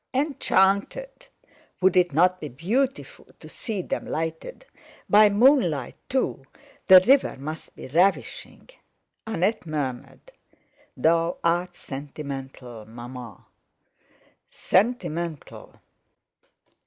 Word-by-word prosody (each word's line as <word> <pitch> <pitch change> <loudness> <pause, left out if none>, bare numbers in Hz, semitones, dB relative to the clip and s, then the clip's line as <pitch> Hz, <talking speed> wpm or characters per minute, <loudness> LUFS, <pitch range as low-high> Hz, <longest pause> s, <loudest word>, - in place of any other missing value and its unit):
Enchanted, 280 - 0 0.5
would 190 0 +3
it 180 -2 +3
not 180 +5 +3
be 150 - -6
beautiful 235 - -2
to - - -12
see 215 -6 -5
them - - -3
lighted? 160 - -5 0.4
By 210 +1 +6
moonlight 200 - +3
too, 255 - -1 0.4
the 185 -1 +10
river 270 - +3
must 155 +4 -8
be - - -10
ravishing! 175 +8 -1 0.6
Annette 200 -2 -1
murmured: 145 - -5 0.7
"Thou 165 +1 +2
art 175 +1 0
sentimental, 135 -6 -8
Maman!" 120 0 -10 1.1
Sentimental! 170 - -2
175 Hz, 90 wpm, -24 LUFS, 145-210 Hz, 1.1 s, the